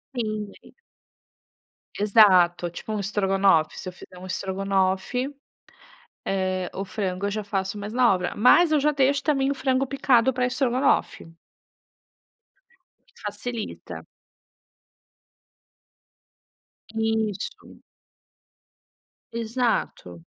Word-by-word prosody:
Sim, 215 Hz, -3 st, -3 dB
e -, -, -16 dB, 1.3 s
Exato. 185 Hz, -5 st, +5 dB
Tipo 175 Hz, +5 st, -7 dB
um 210 Hz, -, -2 dB
estrogonofe. 195 Hz, -5 st, +2 dB
Se -, -, -8 dB
eu -, -, -11 dB
fizer 180 Hz, 0 st, -14 dB
um 185 Hz, -, -10 dB
estrogonofe, 190 Hz, +6 st, -1 dB, 0.9 s
eh, 185 Hz, -1 st, -1 dB
o 195 Hz, -, -4 dB
frango 195 Hz, -2 st, -3 dB
eu -, -, -2 dB
já 215 Hz, +1 st, -3 dB
faço 195 Hz, 0 st, -3 dB
mais 205 Hz, +1 st, -6 dB
na 245 Hz, -1 st, +4 dB
hora. 180 Hz, -2 st, -1 dB
Mas 310 Hz, +10 st, +5 dB
eu 305 Hz, -, +4 dB
já 300 Hz, +2 st, +2 dB
deixo 280 Hz, 0 st, +2 dB
também 275 Hz, -3 st, +1 dB
o -, -, -2 dB
frango 265 Hz, 0 st, 0 dB
picado 265 Hz, -2 st, +2 dB
pra 250 Hz, 0 st, 0 dB
estrogonofe. 255 Hz, -, 0 dB, 1.8 s
Facilita. 235 Hz, -3 st, -6 dB, 2.9 s
Isso. 220 Hz, -2 st, -3 dB, 1.6 s
Exato. 230 Hz, -, -2 dB
210 Hz, 95 wpm, -24 LUFS, 190-250 Hz, 2.9 s, Exato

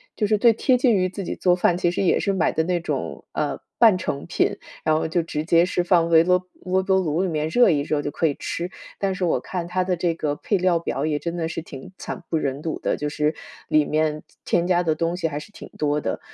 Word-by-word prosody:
就 215 Hz, -, 0 dB
是 210 Hz, 0 st, +2 dB
最 230 Hz, +2 st, +5 dB
贴 250 Hz, +3 st, +2 dB
近 245 Hz, -2 st, +3 dB
于 185 Hz, -1 st, +1 dB
自 195 Hz, +1 st, -6 dB
己 -, -, -4 dB
做 180 Hz, -1 st, +3 dB
饭， 175 Hz, -1 st, +2 dB
其 175 Hz, -1 st, +1 dB
实 180 Hz, -, -2 dB
也 185 Hz, -, +3 dB
是 200 Hz, -, 0 dB
买 185 Hz, -, +1 dB
的 160 Hz, -, 0 dB
那 175 Hz, 0 st, 0 dB
种， 170 Hz, -, -4 dB
呃， -, -, -2 dB, 0.2 s
半 225 Hz, -5 st, +6 dB
成 140 Hz, -5 st, -3 dB
品， -, -, 0 dB, 0.3 s
然 155 Hz, -, +3 dB
后 160 Hz, -, -1 dB
就 170 Hz, +1 st, +1 dB
直 155 Hz, -2 st, -3 dB
接 170 Hz, 0 st, +5 dB
是 180 Hz, -1 st, 0 dB
放 170 Hz, -2 st, +3 dB
微 165 Hz, 0 st, +6 dB
啰 180 Hz, +1 st, +2 dB, 0.2 s
微 185 Hz, +1 st, +1 dB
波 190 Hz, 0 st, +2 dB
炉 165 Hz, -1 st, 0 dB
里 190 Hz, -, 0 dB
面 155 Hz, -1 st, -1 dB
热 240 Hz, +5 st, +5 dB
一 150 Hz, -5 st, +2 dB
热 145 Hz, 0 st, -1 dB
就 145 Hz, -, -3 dB
可 165 Hz, -, -1 dB
以 150 Hz, -, +2 dB
吃。 175 Hz, +2 st, -4 dB, 0.3 s
但 195 Hz, -1 st, -1 dB
是 185 Hz, -, -4 dB
我 170 Hz, -, +1 dB
看 175 Hz, -2 st, -5 dB
它 185 Hz, +1 st, 0 dB
的 180 Hz, -1 st, 0 dB
这 170 Hz, -1 st, 0 dB
个 150 Hz, -3 st, -1 dB
配 200 Hz, -, 0 dB
料 180 Hz, -2 st, +2 dB
表 145 Hz, -3 st, -2 dB
也 150 Hz, -2 st, 0 dB
真 170 Hz, +2 st, -4 dB
的 165 Hz, -, -1 dB
是 165 Hz, 0 st, -4 dB
挺 140 Hz, -1 st, -10 dB
惨 -, -, -6 dB
不 160 Hz, -, +1 dB
忍 140 Hz, 0 st, -2 dB
睹 160 Hz, -, -3 dB
的， -, -, -1 dB
就 150 Hz, 0 st, -2 dB
是， 150 Hz, +1 st, 0 dB, 0.3 s
里 155 Hz, -1 st, +3 dB
面 155 Hz, 0 st, 0 dB, 0.2 s
添 175 Hz, 0 st, +1 dB
加 175 Hz, -1 st, +2 dB
的 160 Hz, -3 st, 0 dB
东 165 Hz, +2 st, -1 dB
西 170 Hz, -3 st, -1 dB
还 145 Hz, -1 st, -4 dB
是 205 Hz, -, -12 dB
挺 -, -, -11 dB
多 150 Hz, 0 st, 0 dB
的。 -, -, -2 dB
170 Hz, 285 characters per minute, -23 LUFS, 155-185 Hz, 0.3 s, 半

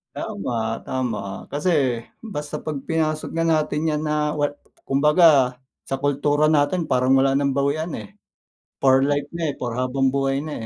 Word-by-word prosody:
Tama, 100 Hz, +4 st, -4 dB, 0.3 s
tama. 115 Hz, -7 st, -4 dB
Kasi 150 Hz, +6 st, -1 dB, 0.5 s
basta 150 Hz, -9 st, -6 dB
pag 155 Hz, -2 st, -2 dB
pinasok 155 Hz, -1 st, -1 dB
na 165 Hz, -, -1 dB
natin 155 Hz, -1 st, +1 dB
yan 150 Hz, -, -2 dB
na 150 Hz, -1 st, 0 dB
way 145 Hz, -1 st, 0 dB, 0.3 s
kumbaga 145 Hz, -2 st, +4 dB, 0.3 s
sa 135 Hz, -, -1 dB
kultura 145 Hz, +2 st, +2 dB
natin 155 Hz, +4 st, +2 dB
parang 130 Hz, -3 st, +2 dB
wala 135 Hz, 0 st, +4 dB
ng 140 Hz, 0 st, +1 dB
bawian, 145 Hz, +4 st, -1 dB
eh, 105 Hz, -2 st, -10 dB, 0.6 s
for 135 Hz, 0 st, +4 dB
life 145 Hz, +1 st, +1 dB
na, 165 Hz, -3 st, -1 dB
eh, -, -, -6 dB
for 120 Hz, -2 st, -3 dB
pang 130 Hz, +1 st, -1 dB
habangbuhay 135 Hz, +1 st, +1 dB
na, 155 Hz, -, -5 dB
145 Hz, 160 wpm, -22 LUFS, 135-155 Hz, 0.6 s, kumbaga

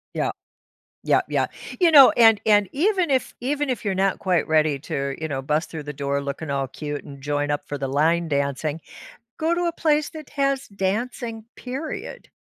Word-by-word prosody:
Yeah. -, -, 0 dB, 0.7 s
Yeah, -, -, +3 dB
yeah. -, -, +1 dB, 0.3 s
You 345 Hz, -3 st, +5 dB
know, 280 Hz, -3 st, +10 dB
and 225 Hz, -3 st, +7 dB
and 205 Hz, -2 st, +4 dB
even 365 Hz, +2 st, +1 dB
if 260 Hz, -1 st, 0 dB
even 290 Hz, +2 st, -1 dB
if 240 Hz, -4 st, -3 dB
you're 195 Hz, -, +1 dB
not 195 Hz, 0 st, +1 dB
quite 180 Hz, -3 st, +1 dB
ready 155 Hz, -3 st, +2 dB
to, 140 Hz, -3 st, -3 dB
you 160 Hz, -, -2 dB
know, 135 Hz, -3 st, -3 dB
bust 150 Hz, +4 st, -1 dB
through 160 Hz, -3 st, -6 dB
the 150 Hz, 0 st, -6 dB
door 140 Hz, 0 st, -2 dB
looking 140 Hz, +2 st, -5 dB
all 135 Hz, -1 st, -1 dB
cute 145 Hz, +1 st, -6 dB
and 140 Hz, -1 st, -11 dB
join 145 Hz, 0 st, -1 dB
up 145 Hz, -, -1 dB
for 145 Hz, -, -4 dB
the 135 Hz, 0 st, -3 dB
line 160 Hz, +5 st, +2 dB
dancing, 140 Hz, +2 st, -1 dB, 0.6 s
go 325 Hz, +2 st, +1 dB
to 350 Hz, -, 0 dB
a 340 Hz, -, +1 dB
place 305 Hz, -3 st, +1 dB
that 310 Hz, -4 st, -10 dB
has 275 Hz, -1 st, 0 dB
dancing, 220 Hz, +3 st, -3 dB
period. 270 Hz, +5 st, -6 dB
180 Hz, 195 wpm, -23 LUFS, -, 0.7 s, know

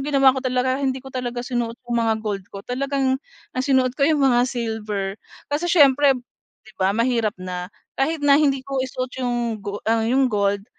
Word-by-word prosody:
ginawa 270 Hz, -2 st, +4 dB
ko 265 Hz, -, -3 dB
talaga, 255 Hz, +1 st, 0 dB
hindi 265 Hz, -1 st, 0 dB
ko 265 Hz, -, -10 dB
talaga 245 Hz, -1 st, -3 dB
sinuot 240 Hz, -2 st, -2 dB
yung 240 Hz, -1 st, 0 dB
mga 225 Hz, -1 st, +2 dB
gold 200 Hz, -2 st, -3 dB
ko. 200 Hz, 0 st, -9 dB
Talagang 265 Hz, +1 st, -1 dB, 0.3 s
ang 255 Hz, -, -2 dB
sinuot 260 Hz, -2 st, +3 dB
ko 280 Hz, +3 st, +2 dB
yung 295 Hz, -3 st, +3 dB
mga 245 Hz, -1 st, +4 dB
silver, 215 Hz, -5 st, -3 dB, 0.3 s
kasi 320 Hz, +4 st, 0 dB
siyempre, 285 Hz, -4 st, +5 dB, 0.5 s
'di 220 Hz, -, -16 dB
ba, 195 Hz, +3 st, +2 dB
mahirap 230 Hz, -3 st, +1 dB
na. 180 Hz, -1 st, -5 dB, 0.2 s
Kahit 290 Hz, +2 st, -1 dB
na 285 Hz, +1 st, +6 dB
hindi 275 Hz, -3 st, +1 dB
ko 275 Hz, -1 st, -2 dB
isuot 255 Hz, 0 st, -4 dB
yung 240 Hz, -3 st, -1 dB
go 205 Hz, 0 st, -6 dB
ang 225 Hz, 0 st, +1 dB
yung 265 Hz, +2 st, +3 dB
gold, 200 Hz, -1 st, +1 dB
250 Hz, 190 wpm, -22 LUFS, 220-270 Hz, 0.5 s, na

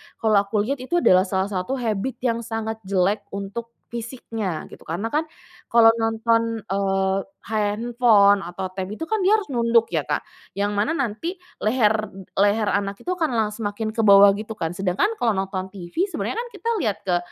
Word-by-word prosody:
kalau 215 Hz, -2 st, +3 dB
aku 205 Hz, 0 st, +1 dB
lihat 270 Hz, +5 st, -2 dB
itu 260 Hz, +7 st, -3 dB
adalah 185 Hz, +1 st, +5 dB
salah 190 Hz, +1 st, -1 dB
satu 190 Hz, +7 st, -2 dB
habit 235 Hz, 0 st, -2 dB
yang 230 Hz, -2 st, +1 dB
sangat 225 Hz, -1 st, -4 dB
jelek 195 Hz, +2 st, +2 dB, 0.2 s
untuk 220 Hz, +4 st, -6 dB
fisiknya 225 Hz, -6 st, -5 dB
gitu -, -, -14 dB
karena 180 Hz, +8 st, -3 dB
kan, 305 Hz, +6 st, 0 dB, 0.4 s
kalau 230 Hz, -1 st, +6 dB
nonton, 230 Hz, 0 st, +1 dB
eee, 195 Hz, -1 st, 0 dB, 0.3 s
handphone 215 Hz, -1 st, +3 dB
atau 185 Hz, +2 st, -5 dB
tab 185 Hz, 0 st, -4 dB
itu 215 Hz, -, -11 dB
kan 440 Hz, -, +1 dB
dia 400 Hz, -, +5 dB
harus 425 Hz, -6 st, +1 dB
nunduk 235 Hz, -2 st, +2 dB
ya -, -, -1 dB
Kak, -, -, -1 dB, 0.3 s
yang 205 Hz, +1 st, -1 dB
mana 210 Hz, +9 st, +1 dB
nanti 275 Hz, -, -2 dB, 0.2 s
leher 215 Hz, -1 st, +2 dB, 0.4 s
leher 205 Hz, +2 st, +3 dB
anak 200 Hz, 0 st, -1 dB
itu -, -, -6 dB
akan 320 Hz, -5 st, 0 dB
la 220 Hz, -2 st, +1 dB
semakin 210 Hz, 0 st, -3 dB
ke 225 Hz, +1 st, -1 dB
bawah 200 Hz, 0 st, +8 dB
gitu 215 Hz, +1 st, -6 dB
kan, 175 Hz, -4 st, -4 dB
sedangkan 190 Hz, -, +1 dB
kalau 230 Hz, -2 st, +2 dB
nonton 190 Hz, -1 st, -3 dB
TV 195 Hz, -, -2 dB
sebenarnya 405 Hz, -, -4 dB, 0.2 s
kita 465 Hz, -, -4 dB
lihat 220 Hz, -, -1 dB
ke 180 Hz, -2 st, +1 dB
215 Hz, 175 wpm, -23 LUFS, 195-235 Hz, 0.4 s, bawah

